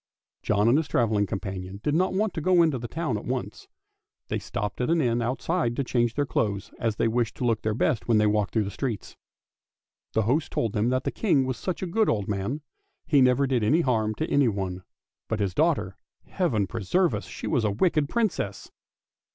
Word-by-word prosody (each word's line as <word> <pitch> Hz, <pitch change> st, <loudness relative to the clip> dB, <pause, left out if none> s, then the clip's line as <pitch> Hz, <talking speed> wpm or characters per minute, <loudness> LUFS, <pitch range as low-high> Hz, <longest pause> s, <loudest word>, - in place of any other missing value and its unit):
John 105 Hz, +1 st, +2 dB
and 130 Hz, +6 st, +5 dB
his 160 Hz, -, -3 dB
travelling 105 Hz, -3 st, +1 dB
companion 95 Hz, 0 st, -5 dB
did 150 Hz, -, +1 dB
not 185 Hz, +4 st, +2 dB
want 205 Hz, +1 st, 0 dB
to 160 Hz, -, -3 dB
go 180 Hz, +1 st, +4 dB
into 155 Hz, -6 st, +1 dB
the 120 Hz, -, -5 dB
town 145 Hz, -7 st, -2 dB
at -, -, -11 dB
once; -, -, -4 dB, 0.6 s
they -, -, -1 dB
stopped 105 Hz, +3 st, -4 dB
at 125 Hz, -, 0 dB
an 165 Hz, 0 st, +3 dB
inn 120 Hz, -4 st, +1 dB
outside 125 Hz, +2 st, -1 dB
to 140 Hz, -, 0 dB
change 120 Hz, -2 st, 0 dB
their 145 Hz, -, +1 dB
clothes, 100 Hz, -7 st, -1 dB
as 115 Hz, -2 st, 0 dB
they 115 Hz, -, +1 dB
wished 115 Hz, 0 st, 0 dB
to -, -, -5 dB
look 115 Hz, -3 st, +1 dB
their 110 Hz, -1 st, -1 dB
best 115 Hz, -, 0 dB
when 115 Hz, -, +4 dB
they 105 Hz, -, +4 dB
walked 105 Hz, -1 st, +1 dB
through 110 Hz, -, +1 dB
the 100 Hz, -, -4 dB
streets. 120 Hz, -1 st, -4 dB, 1.0 s
The 110 Hz, -, +2 dB
host 140 Hz, +9 st, 0 dB
told 115 Hz, -3 st, -1 dB
them 110 Hz, +3 st, +1 dB
that 130 Hz, +1 st, 0 dB
the -, -, -1 dB
King 150 Hz, -11 st, +2 dB
was 130 Hz, -1 st, -2 dB
such 185 Hz, 0 st, -3 dB
a -, -, 0 dB
good 215 Hz, +5 st, +1 dB
old 105 Hz, -3 st, 0 dB
man, 105 Hz, +9 st, -2 dB, 0.4 s
he 145 Hz, -4 st, +4 dB
never 125 Hz, +2 st, +4 dB
did 130 Hz, -4 st, +1 dB
any 150 Hz, +11 st, +3 dB
harm 110 Hz, -7 st, 0 dB
to 160 Hz, -, -2 dB
anyone; 100 Hz, -9 st, 0 dB, 0.5 s
but 110 Hz, -, -2 dB
his 100 Hz, -3 st, 0 dB
daughter -, -, +1 dB, 0.2 s
— -, -, -61 dB
Heaven 125 Hz, -, 0 dB
preserve 115 Hz, -, +1 dB
us! -, -, -3 dB
she -, -, -8 dB
was 130 Hz, -7 st, +1 dB
a 105 Hz, -, +2 dB
wicked 150 Hz, -, +1 dB
Princess. 225 Hz, -3 st, -2 dB
120 Hz, 215 wpm, -26 LUFS, 105-150 Hz, 1.0 s, and